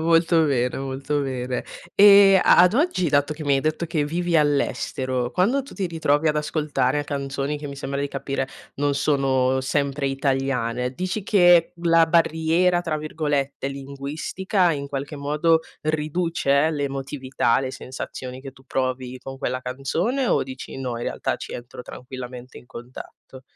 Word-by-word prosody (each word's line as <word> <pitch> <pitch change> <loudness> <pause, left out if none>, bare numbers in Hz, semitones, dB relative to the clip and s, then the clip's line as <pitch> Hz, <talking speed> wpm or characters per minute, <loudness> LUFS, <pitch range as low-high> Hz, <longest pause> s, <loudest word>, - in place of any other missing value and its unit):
Molto 165 0 +3
bene, 125 -4 0
molto 135 +2 -2
bene. 130 -2 -3 0.3
E 200 -1 +8
a - - +5
ad 180 +3 +6
oggi 265 - +1
dato 145 +1 +1
che 155 - -8
mi 140 -1 +3
hai 135 - +2
detto 155 +3 -1
che 155 -3 -1
vivi 170 +2 0
all'estero, 130 -4 0
quando 240 +10 +2
tu 275 - -13
ti 195 - -2
ritrovi 160 -2 +1
ad 150 - +1
ascoltare 150 -2 0
canzoni, 140 0 -3
che 145 - -7
mi 140 - -6
sembra 140 0 -4
di 140 - 0
capire 135 -1 -3 0.3
non 145 0 0
sono 130 -2 +1
sempre 140 +1 -1
italiane, 135 -3 -1
dici 185 +5 -3
che 175 -4 +5
la 165 -1 +5
"barriera" 165 +2 +2
tra 165 -3 -2
virgolette, 145 -3 -2
linguistica, 140 +7 -2
in 140 -2 -3
qualche 140 +2 -5
modo 150 +3 +2 0.2
riduce 155 -1 +1
l'emotività, 135 -4 -1
le 130 -1 -3
sensazioni 130 0 -7
che 135 0 -9
tu 135 - -20
provi 130 -1 -3
con 135 +1 -8
quella 130 -1 -3
canzone 165 - -1
o - - +2
dici: 130 0 -8
"No, 130 -2 -3
in 120 - -5
realtà - - -2
ci - - -8
entro 120 +1 -8
tranquillamente 125 0 -9
in 120 - -13
contatto"? 130 +1 -11
140 Hz, 160 wpm, -23 LUFS, 135-165 Hz, 0.3 s, E